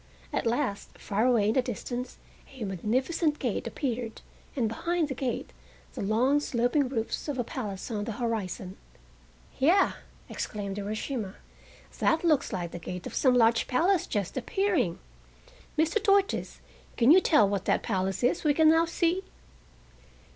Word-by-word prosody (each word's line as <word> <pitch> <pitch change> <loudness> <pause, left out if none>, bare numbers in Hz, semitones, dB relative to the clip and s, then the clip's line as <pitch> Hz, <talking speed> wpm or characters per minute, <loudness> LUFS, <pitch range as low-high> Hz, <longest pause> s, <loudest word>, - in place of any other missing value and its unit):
At - - 0
last, 235 -4 -2
far 215 +4 0
away 225 -5 +3
in - - +2
the 260 - +3
distance 245 +1 -5 0.3
a 260 -4 -7
magnificent 260 - 0
gate - - -2
appeared, 240 -5 -3 0.3
and 245 -5 +1
behind 335 +8 -1
the - - -1
gate, 255 -1 -3 0.4
the - - -5
long, 240 +8 +2
sloping 250 0 +1
roofs 225 +1 -3
of 290 -3 -2
a 245 - 0
palace 210 -3 -5
on 205 -2 -2
the 230 - -4
horizon. 205 -5 -3 0.8
"Ya," 345 +8 +4 0.4
exclaimed 200 -2 -4
Urashima. 210 0 -4 0.6
"That 320 +1 +2
looks 305 -5 +2
like 175 -4 -3
the 175 - -6
gate 180 +2 -6
of - - -6
some 255 -2 +3
large 230 -1 +4
palace 340 +8 +2
just 205 +2 -2
appearing! 390 - 0 0.8
Mr. 325 +7 +2
Tortoise, 395 -2 +1 0.4
can 240 +3 +6
you 370 +3 +8
tell 300 - +5
what 195 -1 -2
that - - +1
place 190 -1 -1
is 245 - +2
we 295 -2 +3
can 315 0 +6
now 325 +1 +4
see?" 340 +2 0
245 Hz, 155 wpm, -28 LUFS, 210-300 Hz, 0.8 s, you